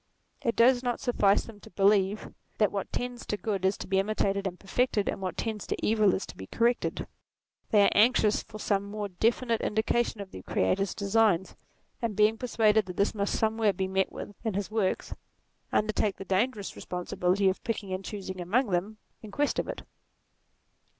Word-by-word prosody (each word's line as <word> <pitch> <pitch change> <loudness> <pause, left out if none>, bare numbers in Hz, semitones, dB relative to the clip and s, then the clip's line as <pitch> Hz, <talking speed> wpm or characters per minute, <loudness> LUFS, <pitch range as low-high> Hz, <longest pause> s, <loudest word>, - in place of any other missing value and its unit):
It 230 - 0
does 245 +1 +5
not 245 -1 -1
suffice 205 -5 +2
them 220 -3 -12
to - - -14
believe, 200 +2 +2 0.2
that 210 - +3
what 200 - -4
tends 245 0 -4
to 210 - -1
good 200 -3 -2
is 190 +1 +2
to - - -6
be 190 0 +2
imitated 200 -1 0
and 180 -1 -6
perfected, 210 0 0
and - - -2
what 185 -3 -4
tends 220 -2 -3
to - - -2
evil 215 -3 +3
is 190 - -3
to - - -11
be 95 - -9
corrected: 235 - 0 0.6
they 210 -2 +5
are - - +4
anxious 215 0 +4
for 220 -1 -11
some 200 -2 0
more 205 0 -5
defi 225 +7 +1
nite 230 -2 0
indication 220 +1 0
of 200 -1 -7
the 95 - -8
Creator's 190 - 0
designs; 200 -3 +2 0.5
and 230 -3 -2
being 210 +2 +4
persuaded 220 -4 +2
that 180 - -7
this 200 - +2
must 200 -1 -1
somewhere 220 -2 +2
be 190 0 -2
met 190 0 0
with 205 - -7
in 220 -4 -2
his 200 +1 -3
works, 215 -4 -1 0.6
undertake 210 -1 +1
the 195 - -9
dangerous 205 +3 -1
responsibility 180 +2 -1
of 190 - 0
picking 210 -4 -3
and 185 +1 -4
choosing 190 -2 -6
among 210 +6 +1
them 195 +5 -1 0.2
in 215 - -9
quest 285 +8 0
of - - -2
it. - - -6
205 Hz, 190 wpm, -28 LUFS, 195-225 Hz, 0.6 s, does